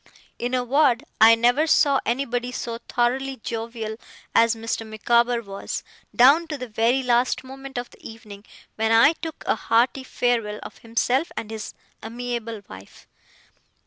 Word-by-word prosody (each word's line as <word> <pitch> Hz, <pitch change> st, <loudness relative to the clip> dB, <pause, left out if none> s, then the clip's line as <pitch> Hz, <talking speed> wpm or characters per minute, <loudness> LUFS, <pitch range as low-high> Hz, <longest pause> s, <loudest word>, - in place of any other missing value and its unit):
In 245 Hz, +2 st, -1 dB
a 250 Hz, -, 0 dB
word, 265 Hz, 0 st, +2 dB, 0.2 s
I 225 Hz, +1 st, +9 dB
never 245 Hz, +7 st, +2 dB
saw 285 Hz, -3 st, +4 dB
anybody 245 Hz, 0 st, -1 dB
so 235 Hz, -2 st, -5 dB
thoroughly 265 Hz, +3 st, 0 dB
jovial 225 Hz, -1 st, -5 dB, 0.4 s
as 230 Hz, 0 st, +4 dB
Mr. 225 Hz, 0 st, -3 dB
Micawber 235 Hz, +2 st, +1 dB
was, 200 Hz, -1 st, -6 dB, 0.3 s
down 285 Hz, +7 st, +6 dB
to 305 Hz, -2 st, -4 dB
the 255 Hz, -1 st, -6 dB
very 230 Hz, +4 st, +1 dB
last 245 Hz, +1 st, +1 dB
moment 270 Hz, 0 st, -9 dB
of 245 Hz, 0 st, -5 dB
the -, -, -20 dB
evening, 210 Hz, -3 st, -11 dB, 0.3 s
when 220 Hz, 0 st, +1 dB
I 230 Hz, +7 st, +6 dB
took 325 Hz, -1 st, -8 dB
a -, -, +2 dB
hearty 240 Hz, +4 st, +1 dB
farewell 230 Hz, -5 st, -1 dB
of -, -, -11 dB
himself 245 Hz, +7 st, 0 dB
and 220 Hz, -, -5 dB
his 220 Hz, -1 st, -7 dB, 0.3 s
amiable 230 Hz, -1 st, -5 dB
wife. 95 Hz, +1 st, -13 dB
240 Hz, 150 wpm, -23 LUFS, 225-260 Hz, 0.4 s, I